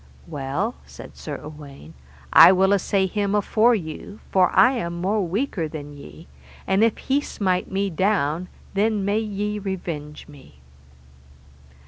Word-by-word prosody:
Well, 150 - -3
said - - -12
Sir - - -6
Uwaine, 145 - -11 0.4
I - - +10
will 190 +1 +3
assay 195 0 +1
him 200 +1 -1
afore 220 +3 +3
you, 175 +3 -7
for 185 -2 +4
I 255 - +5
am 170 -9 -4
more 200 +4 0
weaker 185 - -2
than 145 -1 -8
ye, 75 - -13 0.4
and 195 +3 +2
if 230 -1 +2
he 275 +2 0
smite 185 -9 -2
me 195 0 -1
down 180 -2 0 0.3
then 205 0 +1
may 205 +2 +1
ye 210 -1 -3
revenge 170 -7 -6
me. 140 - -16
190 Hz, 140 wpm, -23 LUFS, 155-210 Hz, 0.4 s, I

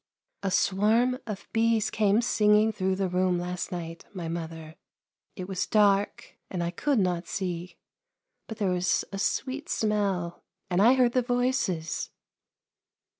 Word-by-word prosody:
" - - -56
A 195 - -1
swarm 215 +7 +2
of 205 -3 -6
bees 225 -1 +2
came 215 +1 +2
singing 210 -1 +4
through 190 -2 -1
the 190 0 0
room 180 0 +1
last 180 0 -4
night, 165 -2 -6
my 175 -3 -4
mother. 160 -1 -6 0.6
It 185 -1 -6
was 190 -2 -2
dark 205 -1 +1
and 180 -2 -2
I 170 - -2
could 280 +9 0
not 180 -3 0
see, 180 -2 -4 0.7
but 220 - -7
there 200 -4 0
was 180 0 +1
a 195 - -5
sweet 275 - -2
smell, 200 -5 -1 0.3
and 180 +2 +3
I 240 +5 +6
heard 250 -2 +4
the 255 - +2
voices." 245 -9 -1
195 Hz, 150 wpm, -27 LUFS, 180-220 Hz, 0.7 s, I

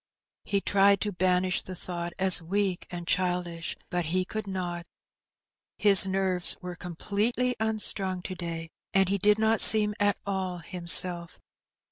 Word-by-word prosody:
He 200 -1 -2
tried 200 0 +2
to 210 - -3
banish 185 0 -1
the 185 - -10
thought 175 -1 -8
as 190 -2 +5
weak 190 +2 -4
and 175 -1 -9
childish, 180 -2 -3
but 175 -1 -3
he 185 +4 -2
could 215 +1 -7
not; 175 -2 -6 0.9
his 200 -2 +6
nerves 190 -2 +3
were 180 -1 -9
completely 210 +9 -3
unstrung 200 -4 -1
to 185 - -7
day, 165 -2 -8 0.3
and 195 -1 +2
he 200 0 -2
did 210 +2 +2
not 220 0 0
seem 210 -1 +8
at 205 -1 0
all 190 -2 -5
himself. 175 -1 0
185 Hz, 145 wpm, -25 LUFS, 175-200 Hz, 0.9 s, seem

